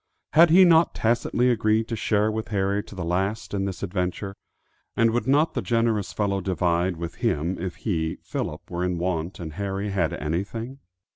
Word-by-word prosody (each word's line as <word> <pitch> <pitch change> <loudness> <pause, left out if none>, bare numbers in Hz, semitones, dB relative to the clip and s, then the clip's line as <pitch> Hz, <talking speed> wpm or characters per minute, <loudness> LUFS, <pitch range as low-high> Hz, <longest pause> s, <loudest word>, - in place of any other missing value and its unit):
Had 165 +3 +7
he 185 +3 +7
not 165 -1 +5
tacitly 120 +2 +2
agreed 110 -1 +1
to 115 - -1
share 105 0 +1
with 110 0 -3
Harry 100 -1 0
to 105 - -12
the 90 -3 -4
last 95 +7 -1
in 100 -1 0
this 95 -2 -5
adventure, 95 +1 -3 0.6
and 115 -1 +4
would 120 +2 -1
not 145 +4 +3
the - - -1
generous 115 -4 0
fellow 100 -2 -1
divide 90 -1 0
with 85 0 -6
him 80 +5 0
if 90 0 -4
he, 80 -7 -2
Philip, - - -5
were 90 +1 -2
in 90 -1 -1
want 85 0 -2
and 80 -3 -6
Harry 100 +2 -3
had 90 -6 +1
anything? 100 - -4
100 Hz, 185 wpm, -25 LUFS, 90-115 Hz, 0.6 s, Had